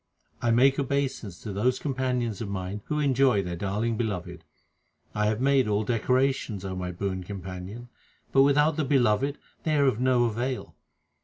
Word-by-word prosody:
I 120 - +1
make 135 +4 +4
obeisance 135 - -2
to 105 - -5
those 125 +6 +1
companions 125 -6 -2
of 110 - -4
mine 95 +1 -4
who 150 - -2
enjoy 135 -7 +3
their 90 -1 -4
darling 105 +5 -1
Beloved. 105 -7 -3 0.7
I 105 0 +1
have 110 +1 0
made 135 -2 +3
all 105 0 +1
decorations, 125 -2 0
O 95 -1 -4
my 90 -1 -3
boon 95 +1 -3
companion, 95 +4 -7 0.4
but 135 - +5
without 150 +2 +4
the 155 - +1
Beloved 135 0 +2 0.2
they 155 -1 0
are 140 - +4
of 130 -5 +2
no 125 -1 +3
avail. 120 +3 -3
120 Hz, 165 wpm, -27 LUFS, 100-135 Hz, 0.7 s, but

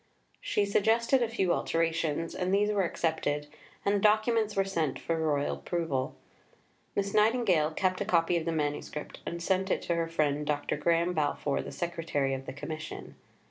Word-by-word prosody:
She 205 - 0
suggested 230 +5 +3
a 235 - +1
few 190 -6 +1
alterations, 165 -1 0
and 185 0 -1
these 205 +2 +3
were 205 -1 +2
accepted, 160 -3 -1 0.4
and 200 - +3
the 205 - +2
documents 215 +1 +3
were 195 0 +2
sent 165 -8 -1
for 165 - -2
the 160 - -2
Royal 145 -2 0
approval. 160 -7 -2 0.8
Miss 200 0 -1
Nightingale 210 -8 +3
kept 185 +4 0
a - - 0
copy 170 -3 +2
of 165 -2 0
the 165 - 0
manuscript, 150 -1 -3
and 170 0 -4
sent 190 +1 +1
it - - 0
to 170 - 0
her 165 -1 0
friend, 150 -3 0
Dr. 145 -1 0
Graham 170 +3 +2
Balfour, 145 -2 0
the - - -7
secretary 165 -6 -1
of 135 0 -5
the - - -5
Commission. 155 +3 -7
170 Hz, 180 wpm, -30 LUFS, 155-200 Hz, 0.8 s, suggested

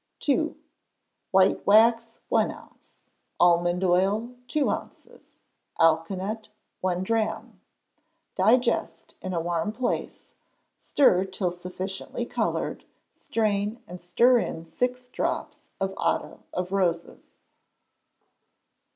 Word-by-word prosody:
ii. 310 +3 +2 0.7
White 190 0 +3
wax, 230 +2 +4
one - - +2
ounce; - - -14 0.4
almond 175 +1 +3
oil, 195 +6 +2
two 300 -2 +1
ounces; - - -8 0.4
alkanet, 185 +7 +1 0.3
one 185 -1 -1
drachm; 220 +1 -2 0.7
digest 220 -5 +1
in 185 - -4
a 175 - -1
warm 170 +3 -1
place, 245 +3 -3 0.5
stir 190 -10 +3
till 190 -1 -2
sufficiently 185 +2 -5
coloured, - - -2 0.3
strain 210 0 -1
and 180 +1 -10
stir 235 +8 +4
in 165 -6 -4
six 250 +7 -2
drops - - -4
of 195 0 -1
otto - - -1
of 180 +1 -3
roses. 175 -4 -2
190 Hz, 100 wpm, -26 LUFS, 180-230 Hz, 0.7 s, wax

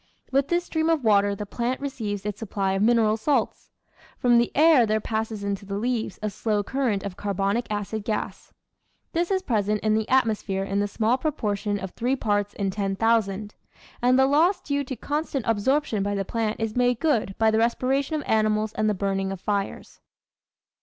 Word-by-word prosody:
With 275 +1 +2
this 345 +2 +1
stream 320 -1 -1
of 320 -5 +1
water 205 -2 +3
the 210 - -5
plant 240 +5 -2
receives 215 -8 -4
its 210 -1 -4
sup 225 - -7
ply 195 -2 0
of 195 - -1
mineral 220 -1 +3
salts. 280 +6 -1 0.5
From 240 -1 +4
the 235 - +1
air 300 -6 +6
there 215 +1 +1
passes 220 -1 -3
into 200 0 -3
the 200 0 -4
leaves 230 -2 -2
a 215 - -1
slow 210 +1 -1
current 240 -4 -1
of 200 -3 -5
carbonic 200 +3 -1
acid 210 0 -3
gas. 215 0 -4 0.6
This 340 0 0
is 380 -1 0
present 210 - 0
in 215 -1 +2
the 220 0 +1
atmo 255 -4 +3
sphere 195 -1 -3
in 195 +1 -1
the 205 - +1
small 225 +5 0
proportion 210 -8 -1
of 190 -2 -6
three 250 +7 -1
parts 205 -4 -1
in 195 -2 -1
ten 195 0 -2
thousand; 215 -1 +1 0.5
and 250 +1 +4
the 265 - +5
loss 325 +7 +3
due 285 -1 -2
to 260 - -5
constant 290 0 -3
absorption 230 +1 +1
by 205 +1 -1
the 195 -1 -2
plant 220 +1 -2
is 225 -1 -2
made 245 -1 +2
good 235 -11 +1
by 220 -1 +3
the 220 - +2
respiration 265 +6 +1
of 300 - -2
animals 215 0 +1
and 215 0 +1
the 210 - 0
burning 195 0 -1
of 195 - -5
fires. 200 0 -3
220 Hz, 200 wpm, -25 LUFS, 205-255 Hz, 0.6 s, air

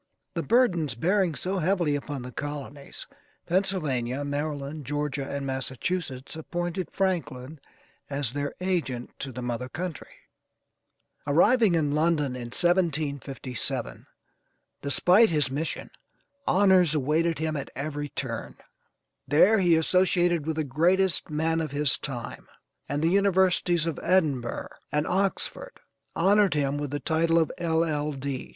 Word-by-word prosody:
The - - -1
burdens 175 - +2
bearing 180 - +1
so 190 +4 -2
heavily 170 -3 +1
upon 145 -2 -5
the 125 - -7
colonies: 145 +1 -6 0.4
Pennsylvania, 145 -9 -1
Maryland, 145 0 -3
Georgia, 145 0 -3
and 140 -1 -3
Massachusetts, 135 +2 -3
appointed 175 +2 -4
Franklin 155 -7 -2 0.5
as 140 -4 -1
their 145 0 -3
agent 170 -10 -2
to 135 - -4
the 125 0 -6
mother 125 +1 -3
country. 170 0 -5 1.2
Arriving 205 - +4
in 150 -3 +1
London 150 -4 +1
in 120 -2 -6
1757, 145 - 0 0.7
despite 180 - +4
his 150 -6 +1
mission, 150 +4 -3 0.6
honors 185 -5 +4
awaited 155 +4 +1
him 155 0 -2
at 140 -2 -4
every 145 +2 -4
turn. 120 -5 -5 0.7
There 190 +9 +5
he 175 -3 +4
associated 175 -1 +2
with 160 - -1
the 155 - 0
greatest 175 +8 +2
men 160 +2 0
of 155 -3 -4
his 145 -1 +2
time, 125 -5 -6 0.4
and 145 +2 -1
the 165 - +4
universities 185 -3 +3
of 165 -3 -3
Edinburgh 150 -10 0 0.2
and 150 +1 +1
Oxford 195 - -2 0.4
honored 200 -2 +4
him 145 -1 0
with 145 -1 -3
the 145 +2 -3
title 165 +1 +1
of 160 -2 +2
L.L.D. 150 -5 -1
155 Hz, 125 wpm, -27 LUFS, 140-175 Hz, 1.2 s, There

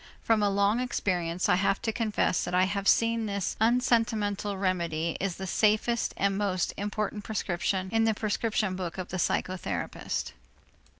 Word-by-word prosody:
From 225 -2 +3
a 205 - +3
long 200 +3 +2
experience 180 -8 -1
I - - +4
have 195 +1 +1
to 225 - 0
confess 215 -5 0
that 180 - -2
I 180 - +5
have 200 +1 -1
seen 230 -1 +3
that 200 - -3
this 200 -3 -2
unsentimental 225 -4 +1
remedy 170 -4 -1
is 195 -3 -2
the 190 - -6
safest 215 +4 +1
and 195 0 +1
most 185 -3 0
important 210 0 -3
prescription 190 -2 -1
in 225 0 +3
the 220 -1 +2
prescription 215 -2 -1
book 180 -2 -5
of 185 -1 -5
the 185 - -3
psychotherapist. 185 +1 -2
200 Hz, 165 wpm, -28 LUFS, 185-220 Hz, -, I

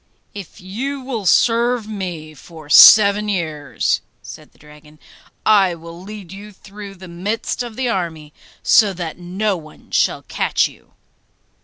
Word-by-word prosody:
'If 200 -4 -10
you 255 +10 -5
will 240 -7 -4
serve 235 +3 +2
me 175 -7 -6
for 155 0 -14
seven 210 +2 +8
years,' 155 - -2 0.2
said - - -12
the - - -28
dragon, 150 +1 -18 0.5
I 195 -5 +4
will 170 +1 -12
lead 200 -2 -10
you 205 +2 -10
through 200 0 -12
the 185 0 -12
midst 200 +8 -4
of 240 -3 -7
the 260 +1 -2
army 165 -8 -4 0.3
so 210 -4 +4
that 175 -2 -6
no 190 +4 -2
one 155 -3 -14
shall - - 0
catch - - 0
you. - - -20
190 Hz, 145 wpm, -19 LUFS, 165-215 Hz, 0.5 s, seven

